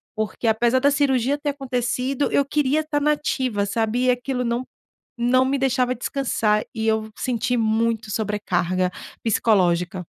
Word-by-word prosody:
Porque, 215 +2 -3
apesar 235 +3 +3
da 280 +2 +4
cirurgia 275 -1 +1
ter 290 - -2
acontecido, 260 0 -1
eu 280 - +3
queria 295 +1 +1
tá 305 -1 -1
na 300 +1 +2
ativa, 255 -8 -1
sabe. 225 +4 0
E 255 - +3
aquilo, 250 0 -2
não 235 +1 -1 0.6
não 255 +2 +4
me 270 +1 0
deixava 255 -1 +1
descansar. 230 -4 0
E 220 0 -2
eu 220 0 0
senti 245 0 -1
muito 225 -1 0
sobrecarga 185 -4 -1 0.3
psicológica. 185 -5 +2
245 Hz, 150 wpm, -22 LUFS, 220-265 Hz, 0.6 s, da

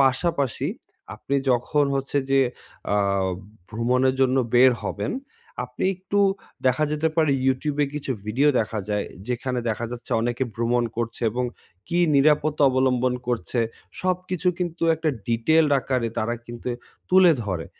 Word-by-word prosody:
পাশাপাশি 135 0 +1 0.5
আপনি 140 - -4 0.2
যখন 130 +4 +2
হচ্ছে, 135 +1 -1
যে 135 0 +5 0.5
অ্যা 105 - +2 0.7
ভ্রমণের 125 +4 +1
জন্য 130 0 +3 0.2
বের 130 +1 +7
হবেন, 100 +2 -2 0.5
আপনি 125 +6 -5
একটু 195 +2 -2 0.5
দেখা 130 +4 +3
যেতে 155 +2 +1
পারে 155 -3 +3 0.2
YouTube 140 +3 0
এ - - -3
কিছু 145 -2 -4
ভিডিও 130 +8 +2
দেখা 110 0 -3
যায়, 105 -1 -1 0.2
যেখানে 125 +1 -2
দেখা 115 +2 -2
যাচ্ছে, 120 -1 -8
অনেকে 120 +2 -1
ভ্রমণ 120 +1 +1
করছে, 115 0 -3
এবং 125 +3 -1 0.4
কি 175 - 0 0.2
নিরাপত্তা 150 +1 +3
অবলম্বন 130 -1 +2
করছে, 120 0 -1 0.4
সবকিছু 185 -1 -1
কিন্তু 175 -2 -3
একটা 160 0 -2 0.2
ডিটেইলড 150 +7 +3
আকারে 125 -3 -1
তারা 115 +2 0
কিন্তু 120 +1 -6 0.4
তুলে 185 -2 +7
ধরে। 90 -6 -3
130 Hz, 140 wpm, -24 LUFS, 120-150 Hz, 0.7 s, বের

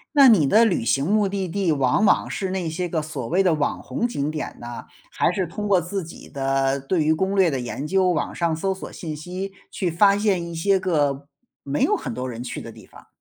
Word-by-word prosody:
那 280 -2 +8
你 180 -11 +5
的 220 +9 +5
旅 190 - +1
行 135 +4 +2
目 205 +1 +2
的 195 -1 -2
地 180 -1 0
往 140 +8 +2
往 - - +3
是 190 - -3
那 185 -2 -2
些 175 +2 -3
个 160 -2 -1
所 150 -6 -5
谓 185 +7 +2
的 180 -4 +3
网 150 -2 -1
红 240 - -1
景 150 -11 -2
点 155 -1 -5
呢， 120 0 -8 0.3
还 - - +1
是 185 0 -1
通 205 +5 -5
过 195 -3 +4
自 175 +2 -4
己 165 - -11
的 135 0 0
对 155 +4 0
于 155 - +3
攻 190 +5 -1
略 190 -4 +4
的 135 - -1
研 125 +3 -5
究， 185 +3 +2
网 160 -5 -1
上 170 -2 0
搜 190 +4 -1
索 190 - -9
信 160 -4 -6
息， 180 +5 -6 0.2
去 180 - -1
发 200 +4 +4
现 200 -4 +1
一 170 - -7
些 195 +4 +2
个 145 -6 0 0.4
没 140 +1 -2
有 - - +3
很 - - -5
多 125 +2 -4
人 120 0 -6
去 125 - -5
的 - - -8
地 - - -14
方？ - - -17
170 Hz, 260 characters per minute, -23 LUFS, 145-195 Hz, 0.4 s, 那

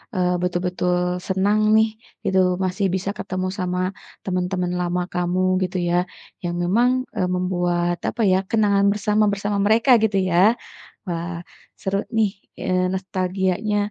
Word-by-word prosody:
eee, 180 -1 +1
betul-betul 180 0 0 0.3
senang 200 +3 +2 0.2
nih 220 0 +5 0.4
gitu 190 0 +3 0.3
masih 190 +2 -1
bisa 190 +1 -2
ketemu 185 -1 -3
sama 180 0 -1 0.5
temen-temen 180 -1 -1
lama 180 0 0
kamu 180 +1 0 0.2
gitu 185 0 -2
ya. 175 - +1 0.5
Yang 175 0 -2
memang, 230 +8 +3 0.3
eee, 180 - 0
membuat 175 -1 0
apa 235 - -4
ya, 185 - +4
kenangan 200 -3 +3
bersama, 210 +1 +1
bersama 205 +1 -2
mereka 230 +5 +4
gitu 205 -2 +2
ya. 170 - +1 0.7
Wah, 170 0 -3 0.5
seru 195 +1 -1 0.2
nih, 215 -3 +3 0.3
eee, 185 0 +1
nostalgianya 190 +2 -1
185 Hz, 135 wpm, -22 LUFS, 180-200 Hz, 0.7 s, nih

